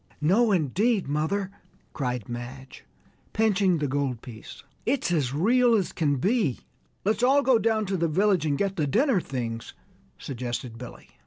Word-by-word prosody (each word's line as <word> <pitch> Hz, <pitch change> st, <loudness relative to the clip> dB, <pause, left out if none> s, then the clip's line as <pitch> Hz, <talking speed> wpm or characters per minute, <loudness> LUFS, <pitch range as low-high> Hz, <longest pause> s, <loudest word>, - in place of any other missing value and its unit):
"No, 210 Hz, +9 st, +3 dB
indeed, 190 Hz, -, +1 dB
mother!" 180 Hz, +7 st, -1 dB, 0.4 s
cried 125 Hz, -6 st, -3 dB
Madge, 120 Hz, +3 st, -8 dB, 0.5 s
pinching 200 Hz, -4 st, +2 dB
the 150 Hz, -2 st, -1 dB
gold 135 Hz, -4 st, -2 dB
piece, 115 Hz, -3 st, -11 dB, 0.2 s
"it's 255 Hz, -7 st, 0 dB
as 145 Hz, -7 st, +1 dB
real 235 Hz, -, +3 dB
as 195 Hz, -5 st, 0 dB
can 145 Hz, -3 st, +1 dB
be!" 185 Hz, -, 0 dB, 0.4 s
"Let's 215 Hz, +3 st, +1 dB
all 275 Hz, +3 st, +4 dB
go 260 Hz, -4 st, +4 dB
down 220 Hz, -1 st, +1 dB
to 190 Hz, -1 st, -1 dB
the 170 Hz, -1 st, +1 dB
village 190 Hz, +2 st, +2 dB
and 145 Hz, -2 st, 0 dB
get 195 Hz, +2 st, -1 dB
the 150 Hz, -3 st, +1 dB
dinner 235 Hz, -, +2 dB
things," 115 Hz, -5 st, -5 dB, 0.4 s
suggested 120 Hz, -2 st, -5 dB
Billy. 125 Hz, -1 st, -10 dB
170 Hz, 155 wpm, -26 LUFS, 130-215 Hz, 0.5 s, all